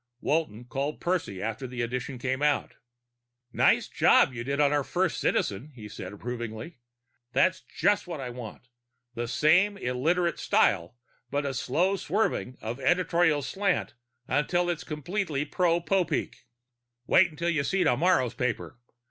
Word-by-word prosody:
Walton 125 Hz, -8 st, -1 dB
called 140 Hz, +4 st, -3 dB
Percy 165 Hz, -, -2 dB
after 115 Hz, +4 st, -3 dB
the 125 Hz, -1 st, -3 dB
edition 125 Hz, +2 st, -4 dB
came 130 Hz, +2 st, -2 dB
out. 150 Hz, 0 st, +1 dB, 0.8 s
"Nice -, -, +3 dB
job 130 Hz, -, +4 dB
you 120 Hz, -1 st, -5 dB
did 140 Hz, +3 st, -2 dB
on 145 Hz, -1 st, +4 dB
our 145 Hz, -1 st, +2 dB
first 180 Hz, +4 st, -1 dB
Citizen," 120 Hz, +10 st, -1 dB
he 110 Hz, -3 st, -9 dB
said 95 Hz, -3 st, -8 dB
approvingly. 120 Hz, -, -6 dB, 0.6 s
"It's 185 Hz, 0 st, +3 dB
just 205 Hz, -2 st, 0 dB
what 170 Hz, -4 st, -5 dB
I 125 Hz, -2 st, -5 dB
want: 120 Hz, -3 st, -9 dB, 0.6 s
same 175 Hz, -, +3 dB
illiterate 165 Hz, +5 st, 0 dB
style, 85 Hz, +7 st, +2 dB, 0.3 s
but 145 Hz, 0 st, -1 dB
a 140 Hz, -, -2 dB
slow 170 Hz, +11 st, +1 dB
swerving 180 Hz, -, -1 dB
of 115 Hz, +4 st, -5 dB
editorial 170 Hz, 0 st, +2 dB
slant 195 Hz, +5 st, -1 dB, 0.3 s
until 175 Hz, +6 st, +1 dB
it's 170 Hz, 0 st, -4 dB
completely 155 Hz, -1 st, -2 dB
pro 170 Hz, +1 st, +1 dB
Popeek." 185 Hz, +1 st, -1 dB, 0.6 s
"Wait 165 Hz, 0 st, +4 dB
till 170 Hz, +2 st, 0 dB
you 150 Hz, -4 st, 0 dB
see 195 Hz, +5 st, +1 dB
tomorrow's 130 Hz, -3 st, +2 dB
paper. 125 Hz, 0 st, -3 dB
145 Hz, 140 wpm, -28 LUFS, 125-175 Hz, 0.8 s, job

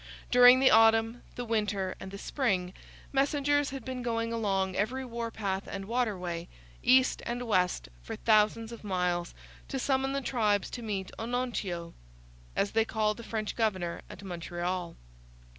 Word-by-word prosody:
During 250 Hz, +1 st, +8 dB
the 265 Hz, -, +5 dB
autumn, 225 Hz, +1 st, +5 dB
the 245 Hz, -, -4 dB
winter, 205 Hz, -4 st, 0 dB
and 190 Hz, -, -7 dB
the 200 Hz, -, -7 dB
spring, 195 Hz, -7 st, -1 dB, 0.4 s
messengers 285 Hz, +1 st, +2 dB
had 270 Hz, 0 st, -7 dB
been 260 Hz, -1 st, -4 dB
going 230 Hz, -1 st, -1 dB
along 195 Hz, -4 st, 0 dB
every 250 Hz, +7 st, -1 dB
warpath 225 Hz, -5 st, -3 dB
and 195 Hz, -1 st, -5 dB
waterway, 190 Hz, -7 st, -2 dB, 0.3 s
east 260 Hz, 0 st, +4 dB
and 240 Hz, +1 st, -3 dB
west 180 Hz, -, +1 dB
for -, -, -6 dB
thousands 220 Hz, +1 st, +3 dB
of 235 Hz, -, -9 dB
miles, 180 Hz, -3 st, -1 dB, 0.3 s
to 270 Hz, -, -3 dB
summon 270 Hz, +1 st, +1 dB
the 275 Hz, -, -1 dB
tribes 215 Hz, -6 st, +1 dB
to 245 Hz, -, -5 dB
meet 200 Hz, -4 st, -3 dB
Onontio; 225 Hz, -8 st, -3 dB, 0.6 s
as 200 Hz, -, +1 dB
they 225 Hz, 0 st, +3 dB
called 215 Hz, -1 st, 0 dB
the 235 Hz, -, -8 dB
French 220 Hz, -2 st, -3 dB
governor, 190 Hz, -7 st, -1 dB
at -, -, -10 dB
Montreal. 175 Hz, -1 st, -4 dB
220 Hz, 150 wpm, -30 LUFS, 190-245 Hz, 0.6 s, During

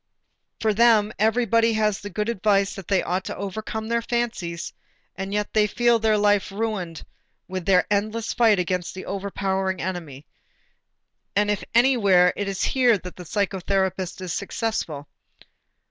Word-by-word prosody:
For 220 Hz, -1 st, +1 dB
them 220 Hz, -1 st, +4 dB
everybody 230 Hz, +1 st, +3 dB
has 215 Hz, -2 st, +1 dB
the 205 Hz, -, -7 dB
good 210 Hz, +2 st, -2 dB
advice 200 Hz, -3 st, +1 dB
that 195 Hz, -3 st, -9 dB
they 195 Hz, -2 st, +2 dB
ought 185 Hz, +2 st, -1 dB
to -, -, -5 dB
overcome 220 Hz, +2 st, -5 dB
their 235 Hz, 0 st, 0 dB
fancies; 230 Hz, -8 st, -3 dB, 0.4 s
and 195 Hz, +1 st, -5 dB
yet 210 Hz, 0 st, -2 dB
they 215 Hz, -1 st, +4 dB
feel 240 Hz, +2 st, +2 dB
their 220 Hz, -1 st, +2 dB
life 205 Hz, -1 st, +2 dB
ruined 195 Hz, -6 st, -3 dB, 0.4 s
with 185 Hz, 0 st, -5 dB
their 185 Hz, -2 st, +4 dB
endless 215 Hz, +2 st, -1 dB
fight 225 Hz, -4 st, +4 dB
against 180 Hz, 0 st, -2 dB
the 185 Hz, -, -7 dB
overpowering 190 Hz, -1 st, -2 dB
enemy. 165 Hz, -6 st, -5 dB, 1.1 s
And 205 Hz, 0 st, +2 dB
if 205 Hz, -, -2 dB
anywhere, 200 Hz, -8 st, +5 dB
it 205 Hz, -, -3 dB
is 195 Hz, 0 st, -2 dB
here 245 Hz, -4 st, +3 dB
that 180 Hz, -1 st, -10 dB
the 180 Hz, -, -10 dB
psychotherapist 190 Hz, -1 st, -1 dB
is 180 Hz, -2 st, -4 dB
successful. 195 Hz, -9 st, -3 dB
200 Hz, 150 wpm, -24 LUFS, 185-220 Hz, 1.1 s, anywhere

